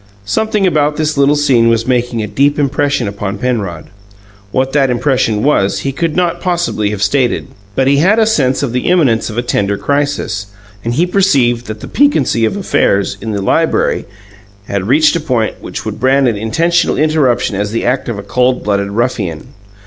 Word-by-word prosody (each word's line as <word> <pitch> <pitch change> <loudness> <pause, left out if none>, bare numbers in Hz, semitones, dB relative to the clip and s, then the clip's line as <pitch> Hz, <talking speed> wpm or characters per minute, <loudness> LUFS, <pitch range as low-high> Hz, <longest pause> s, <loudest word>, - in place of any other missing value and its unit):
Something 210 - 0
about 150 -4 +1
this 155 -1 -1
little 140 +1 +3
scene 130 -6 +3
was 115 0 +1
making 120 -3 0
a - - -3
deep 140 +7 +1
impression 145 -3 0
upon 100 0 -4
Penrod. 100 -9 -3 0.6
What 130 +3 -1
that 140 -2 +2
impression 120 -4 0
was, 100 -9 +1
he 135 - -2
could 160 +3 -2
not 175 -1 0
possibly 175 - -1
have 105 -1 -3
stated; 125 +3 0 0.3
but 135 - +2
he 140 +1 +3
had 190 +9 +3
a 225 - +4
sense 140 -12 +1
of 125 -4 -2
the 125 - -1
imminence 145 -13 +2
of 110 - -7
a 120 - 0
tender 100 -4 -1
crisis, 140 -8 -2 0.4
and 115 +1 -2
he 165 +6 +2
perceived 135 -11 +1
that 110 0 -7
the - - -7
piquancy 150 - +2
of 195 - -2
affairs 100 - +1
in 110 - -5
the 100 -2 -3
library - - +1 0.6
had 100 -1 -3
reached 150 +6 +4
a - - +1
point 125 -8 -2
which - - -7
would - - -5
brand 135 +1 +3
an 115 - +1
intentional 165 +12 0
interruption 140 -7 +1
as 100 +1 -2
the 115 +2 -2
act 125 +1 -1
of 115 - -3
a 100 - -6
cold 125 +5 0
blooded 100 -1 0
ruffian. 100 -7 -2
125 Hz, 190 wpm, -14 LUFS, 110-150 Hz, 0.6 s, a